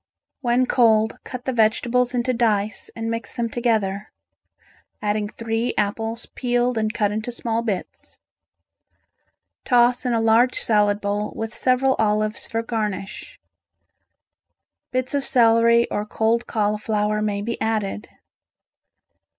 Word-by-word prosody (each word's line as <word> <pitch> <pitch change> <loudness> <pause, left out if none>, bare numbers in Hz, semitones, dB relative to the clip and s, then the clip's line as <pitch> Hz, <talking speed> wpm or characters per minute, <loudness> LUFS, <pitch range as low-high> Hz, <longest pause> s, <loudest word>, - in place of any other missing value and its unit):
When 250 -1 +2
cold, 220 -3 +3
cut 250 -1 -8
the 260 - -1
vegetables 240 +2 +2
into 245 +1 0
dice 215 -3 0
and 225 0 -4
mix 230 0 -4
them 235 -1 -1
together, 215 -4 -1 0.9
adding 210 0 -1
three 230 +2 -2
apples 225 +2 -2
peeled 245 0 0
and 215 -1 0
cut 210 -2 0
into 215 +3 -3
small 230 -1 -2
bits. 210 -6 -5 1.5
Toss 245 0 +3
in 250 -2 0
a 230 - +2
large 225 +3 +3
salad 210 -1 +2
bowl 205 +1 -2
with 225 +1 -4
several 260 +1 +2
olives 215 0 0
for 225 0 -2
garnish. 215 - -4 1.5
Bits 255 +1 -2
of 280 -1 0
celery 235 -1 +4
or 205 - -1
cold 225 +2 0
cauliflower 210 0 0
may 205 -1 -1
be 235 +2 -4
added. 215 -2 -2
225 Hz, 125 wpm, -22 LUFS, 210-240 Hz, 1.5 s, celery